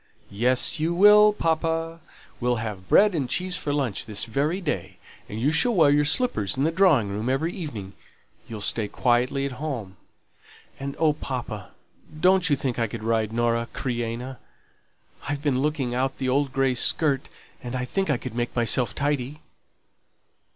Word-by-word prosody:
"Yes, 125 +8 +2
you 165 +2 0
will, 210 +3 +7
papa. 165 -2 -1 0.4
We'll 125 0 +1
have 105 -5 -6
bread 205 0 +5
and 140 -7 -2
cheese 180 +4 -1
for 145 - -3
lunch 135 -9 -2
this 105 -2 -1
very 145 - -1
day. 145 - -4 0.3
And 105 - -5
you 135 +6 +2
shall 225 +10 +2
wear 155 -5 +5
your 145 0 +3
slippers 130 - +1
in 135 - +1
the 160 - +2
drawing 165 - +3
room 105 +5 -3
every 155 +6 0
evening 110 - -7 0.5
you'll 110 -2 -7
stay 105 +1 +1
quietly 125 +4 +1
at 140 - -3
home; 115 -11 -5 0.8
and 140 0 -5
oh, 160 -2 +3
papa, 120 -8 -6 0.5
don't 185 +1 +3
you 145 - +4
think 130 -3 -3
I 115 - +1
could 110 +1 -7
ride 110 -1 0
Nora 115 0 0
Creina? 120 +1 -4 0.9
I've 145 0 -3
been 135 -3 +1
looking 145 -4 -1
out 130 +2 -1
the 130 -1 -2
old 140 +1 +1
grey 135 -1 +1
skirt, 140 +3 +1 0.3
and 125 +1 -6
I 125 0 -2
think 190 +7 -2
I 140 - +2
could 125 -1 -7
make 120 0 -3
myself 120 -1 +1
tidy." 145 0 -2
135 Hz, 170 wpm, -25 LUFS, 115-155 Hz, 0.9 s, will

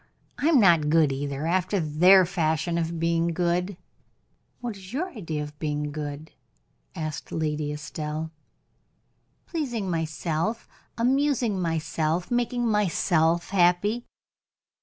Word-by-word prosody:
I 295 - +1
am 320 -5 +5
not 170 -7 +5
good 155 -2 +4
either, 140 +2 -3
after 185 +3 +1
their 180 +4 +5
fashion 170 0 0
of 165 0 -2
being 165 0 +1
good." 180 +2 0 0.8
"What 240 -3 -4
is 190 -1 -12
your 360 +7 -2
idea 165 - -4
of 150 0 -10
being 150 -1 -2
good?" 150 +1 -6 0.6
asked 155 -2 -5
Lady 150 -2 -1
Estelle. 155 +1 -5 1.1
"Pleasing 240 - -3
myself, 165 +5 -2 0.3
amusing 250 -4 +1
myself, 165 +1 -1
making 245 0 0
myself 175 -5 +1
happy." 200 +5 +2
170 Hz, 115 wpm, -26 LUFS, 155-200 Hz, 1.1 s, am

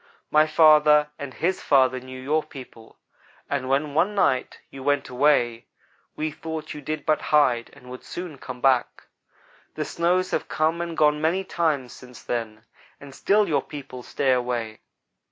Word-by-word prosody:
My 155 +1 +5
father 150 -1 +5
and 140 -2 -6
his 185 +7 -2
father 130 -2 +3
knew 130 0 -10
your 150 +4 0
people, 125 -6 -13 0.5
and 130 -2 -3
when 140 +2 0
one 190 +7 +1
night 130 -10 +1
you 135 - -10
went 145 0 0
away, 125 -3 +1 0.5
we 155 0 -2
thought 160 +1 -6
you 150 - -8
did 155 +2 -5
but 155 -1 +1
hide 125 -6 +2
and 125 - -17
would 125 - -9
soon 175 -6 -7
come 125 -1 -8
back. 130 -2 +1 0.7
The - - -3
snows 180 +2 0
have - - -2
come 160 +2 0
and 170 -1 -5
gone 150 0 +3
many 170 +5 +1
times 155 -8 -1
since 125 -2 -14
then, 110 -2 -4 0.3
and 140 -1 -12
still 205 +8 +2
your 155 - +1
people 140 -4 -9
stay 135 +2 -1
away. 120 -3 -2
145 Hz, 165 wpm, -24 LUFS, 130-155 Hz, 0.7 s, My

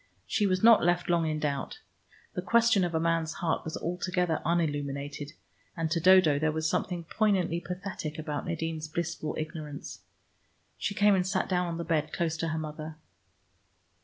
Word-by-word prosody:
She 210 -2 +1
was 185 0 0
not 230 -1 +7
left 175 +1 +2
long 170 -2 +2
in 155 - -1
doubt. 145 - -2 0.6
The - - -2
question 235 -4 +4
of 175 -2 -1
a - - +2
man's 165 -1 0
heart 165 -2 -1
was 160 - -4
altogether 180 -1 -1
unilluminated, 145 -3 -2 0.4
and 165 -1 -1
to 170 - +2
Dodo 170 -4 +6
there 155 +1 +1
was 160 0 -1
something 175 +2 -1
poignantly 185 -3 +1
pathetic 180 -4 -5
about 150 -2 -4
Nadine's 160 -1 -3
blissful 160 -1 -3
ignorance. 155 -2 -6 0.7
She 200 - -3
came 205 +1 +5
and 185 -1 +2
sat 190 -1 0
down 180 -1 +1
on 170 -1 -3
the 170 - -3
bed 155 -2 -1
close 165 -2 0
to 165 - -2
her 160 0 -2
mother. 155 0 -6
165 Hz, 170 wpm, -29 LUFS, 155-180 Hz, 0.7 s, not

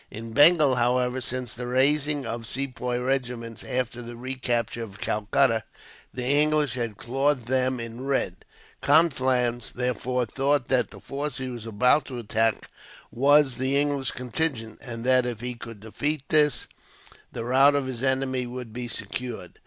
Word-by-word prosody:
In 115 +1 -7
Bengal, 150 0 +6
however, 125 +1 +1
since 125 0 -3
the 120 +1 -5
raising 140 +2 +2
of 115 0 -5
Sepoy 125 -2 -2
regiments 125 -3 -2
after 125 -1 -2
the 120 0 -8
recapture 120 -2 -2
of 100 -4 -8
Calcutta, 110 +2 +1 0.5
the 125 - -5
English 150 0 +2
had 115 -5 -3
clothed 135 +1 0
them 130 0 +1
in 115 +1 -7
red. 135 -10 -1 0.4
Conflans, 130 -6 +2
therefore, 125 0 -1
thought 135 +2 0
that 125 -3 +2
the - - -12
force 145 +2 -4
he 130 -1 -4
was 120 -2 -7
about 125 +6 +3
to 130 - -6
attack 115 -1 0 0.4
was 140 +1 +4
the 130 +2 +1
English 145 -3 0
contingent; 125 -3 -2
and 115 -2 -6
that, 130 0 +3
if 115 -2 -5
he 125 0 -3
could 115 -3 -10
defeat 145 +7 -2
this, 150 -5 +3 0.7
the 115 - -5
rout 135 +3 +5
of 140 -2 0
his 130 -3 -5
enemy 130 -1 0
would 120 -2 -7
be 120 0 -4
secured. 110 -3 -6
125 Hz, 155 wpm, -26 LUFS, 120-135 Hz, 0.7 s, Bengal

